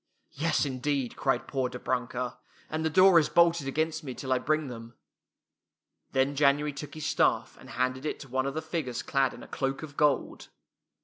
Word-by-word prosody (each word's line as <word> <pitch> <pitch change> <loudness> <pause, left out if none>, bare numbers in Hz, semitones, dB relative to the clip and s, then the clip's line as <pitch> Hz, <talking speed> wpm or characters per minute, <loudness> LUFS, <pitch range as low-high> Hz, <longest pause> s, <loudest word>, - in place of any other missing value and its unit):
" - - -46
"Yes, 155 +1 +1
indeed!" 135 -1 -2
cried 135 - 0
poor 130 -3 -1
Dobrunka, 125 0 -3
" - - -29
and 155 +1 -1
the 160 - +1
door 185 +1 +7
is 155 - 0
bolted 170 -4 +4
against 155 +3 -1
me 130 -4 -6
till 130 -2 -1
I 130 - +1
bring 155 +1 0
them." 115 -1 -9 1.2
Then 135 +2 +1
January 145 +1 +3
took 145 +1 -8
his 155 - -5
staff - - +1
and - - -13
handed 130 +1 -1
it - - -3
to 140 - -9
one 130 +1 -1
of 140 - -4
the 160 - -3
figures 155 -6 -3
clad 135 -2 +1
in - - -11
a - - -11
cloak 135 +2 -2
of 145 -2 -9
gold. 145 -3 +1
140 Hz, 200 wpm, -29 LUFS, 130-155 Hz, 1.2 s, door